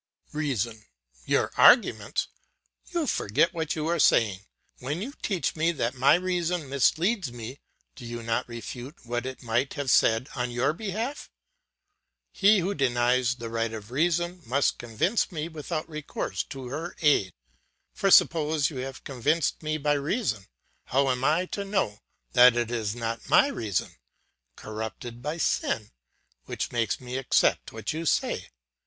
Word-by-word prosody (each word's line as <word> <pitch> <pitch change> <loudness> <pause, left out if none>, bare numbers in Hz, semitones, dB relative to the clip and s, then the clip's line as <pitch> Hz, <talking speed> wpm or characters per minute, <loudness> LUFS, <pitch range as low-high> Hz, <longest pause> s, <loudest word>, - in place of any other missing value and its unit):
"REASON: 120 -8 -2 0.4
Your - - +2
arguments! 240 - +5 0.6
You 340 -3 0
forget 160 - +1
what 160 -2 -2
you 155 -1 -2
are 170 +1 0
saying. 105 -9 +4 0.4
When 145 +6 -3
you 250 +9 -5
teach 190 -5 -1
me 165 +2 +2
that 120 -5 -1
my 130 +3 +5
reason 180 -3 -1
misleads 165 - +1
me, 120 +3 -8 0.4
do - - -11
you 120 0 -6
not 115 +1 -1
refute 120 +4 -8
what 120 +2 -2
it 130 -1 -7
might 120 +3 0
have 140 -3 -1
said 115 +3 +4
on 125 -1 -1
your 120 +5 +1
behalf? 220 - -4 1.0
He 200 0 +4
who 190 +4 -1
denies 125 -2 +2
the 115 -2 -7
right 115 0 -1
of 110 0 -8
reason, 175 +5 0
must 135 +3 +1
convince 120 - 0
me 160 -2 -3
without 160 0 -5
recourse 155 -2 -4
to 130 -2 -8
her 160 +6 -5
aid. 140 -11 +4 0.6
For 195 - +1
suppose 155 -4 +4
you 140 - -7
have 130 +1 -6
convinced 145 +5 0
me 155 0 -1
by 145 0 +1
reason, 145 - -1 0.4
how 135 +1 +2
am 125 0 -2
I 160 +6 +3
to 200 - -2
know 195 - -1 0.3
that 125 0 +7
it 120 -1 -1
is 110 -3 -2
not 115 -1 -4
my 280 - +6
reason, 105 - -3 0.6
corrupted 110 +2 -7
by 150 +5 -3
sin, 110 -8 -1 0.5
which - - -4
makes 115 -1 0
me 125 0 -5
accept 135 -1 +2
what 110 +3 -4
you 165 +1 -3
say? - - 0
135 Hz, 155 wpm, -27 LUFS, 120-165 Hz, 1.0 s, that